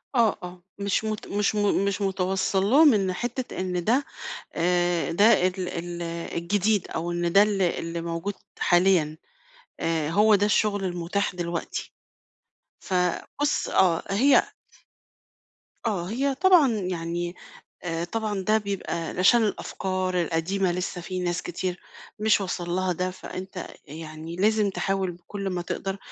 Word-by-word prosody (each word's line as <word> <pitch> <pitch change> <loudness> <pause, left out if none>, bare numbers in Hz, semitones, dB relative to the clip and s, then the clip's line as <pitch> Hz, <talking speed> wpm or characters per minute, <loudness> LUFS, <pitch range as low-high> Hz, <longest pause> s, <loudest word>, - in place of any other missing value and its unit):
آه، 230 -3 +3
آه، 180 0 -9 0.2
مش 200 +1 0
مت 215 -1 -3
مش 205 +1 0
م 205 -1 +2
مش 200 0 -1
متوصَّل 190 0 0
لهُم 290 +2 +7
إن 195 -3 +1
حتّة 240 +4 -4
إن 180 -1 -1
ده 250 +9 +2 0.5
آآ، 175 0 +1
ده 200 +5 +4 0.2
ال 185 -1 -3
ال 175 0 -5 0.4
الجديد 205 +3 +1
أو 170 +2 -3
إن 175 0 -1
ده 200 - +8
ال 205 -2 0
اللي 170 -1 -1
موجود 170 +4 -3 0.3
حاليًا. 175 -4 +3 0.6
آآ، 160 -2 0
هو 210 +5 +5
ده 205 0 +3
الشغل 210 -1 +1
المُتاح 180 +2 -1
دلوقتي. 170 -1 -4 0.9
فبُص 185 - -1
آه، 175 -3 +3
هي 255 +8 +5 1.4
آه، 190 -6 -1
هي 270 +5 0
طبعًا 350 -5 +5
يعني 175 -3 -3 0.5
آآ، 165 -1 -2
طبعًا 210 +2 -2
ده 215 +3 +3
بيبقى 200 -2 -3
علشان 225 +6 +4
الأفكار 185 -3 -1
القديمة 175 +4 0
لسّه 180 0 -3
في 185 +2 -4
ناس 175 -1 -1
كتير 180 +1 -4 0.4
مش 215 -1 +3
واصل 180 -2 -3
لها 185 +1 0
ده، 180 +2 -2
فأنت 185 0 -7 0.2
يعني 155 +2 -8
لازم 210 +2 +2
تحاول 195 -1 -1
بكل 195 +3 -6
ما 180 -1 -2
تقدر، 195 +2 -4
185 Hz, 140 wpm, -26 LUFS, 175-205 Hz, 1.4 s, ده